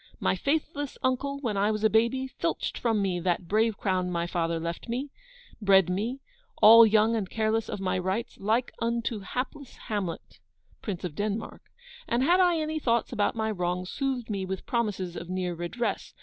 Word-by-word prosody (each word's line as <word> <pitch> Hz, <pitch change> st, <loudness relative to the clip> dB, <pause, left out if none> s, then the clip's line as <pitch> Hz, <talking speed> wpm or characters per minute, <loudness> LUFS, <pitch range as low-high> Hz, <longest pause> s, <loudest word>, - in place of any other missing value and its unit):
My -, -, +1 dB
faithless 290 Hz, -1 st, -2 dB
uncle, 270 Hz, +2 st, 0 dB
when 220 Hz, -7 st, -1 dB
I 200 Hz, +2 st, +2 dB
was 215 Hz, 0 st, -2 dB
a -, -, +7 dB
baby, 235 Hz, +4 st, +2 dB
filched 260 Hz, -, -3 dB
from 225 Hz, -4 st, +1 dB
me 185 Hz, -2 st, 0 dB
that 175 Hz, 0 st, -1 dB
brave 220 Hz, +2 st, +2 dB
crown 185 Hz, -2 st, 0 dB
my 170 Hz, -1 st, -1 dB
father 165 Hz, -1 st, -1 dB
left 170 Hz, +7 st, -5 dB
me, 265 Hz, +4 st, -3 dB, 0.5 s
bred 195 Hz, -3 st, +5 dB
me, 230 Hz, +9 st, -2 dB, 0.4 s
all 225 Hz, +1 st, +9 dB
young 220 Hz, +1 st, +3 dB
and 200 Hz, -4 st, -2 dB
careless 220 Hz, 0 st, 0 dB
of -, -, -4 dB
my 185 Hz, -1 st, 0 dB
rights, 190 Hz, +6 st, -3 dB
like 225 Hz, +5 st, +1 dB
unto 235 Hz, -1 st, -1 dB
hapless 255 Hz, +6 st, -5 dB
Hamlet, 195 Hz, -6 st, -4 dB, 0.4 s
Prince 195 Hz, -5 st, -4 dB
of 175 Hz, -4 st, -4 dB
Denmark; 210 Hz, +5 st, -3 dB, 0.5 s
and 240 Hz, +2 st, +1 dB
had 350 Hz, +6 st, +4 dB
I 355 Hz, -2 st, +4 dB
any 315 Hz, 0 st, -2 dB
thoughts 235 Hz, -3 st, 0 dB
about 210 Hz, -1 st, +1 dB
my 220 Hz, -1 st, -1 dB
wrongs, 180 Hz, -1 st, -2 dB
soothed 265 Hz, -4 st, -2 dB
me 195 Hz, -2 st, -2 dB
with 190 Hz, 0 st, -5 dB
promises 205 Hz, -7 st, -2 dB
of 175 Hz, -, -7 dB
near 185 Hz, -1 st, -2 dB
redress. 195 Hz, +6 st, -3 dB
215 Hz, 180 wpm, -28 LUFS, 185-240 Hz, 0.5 s, all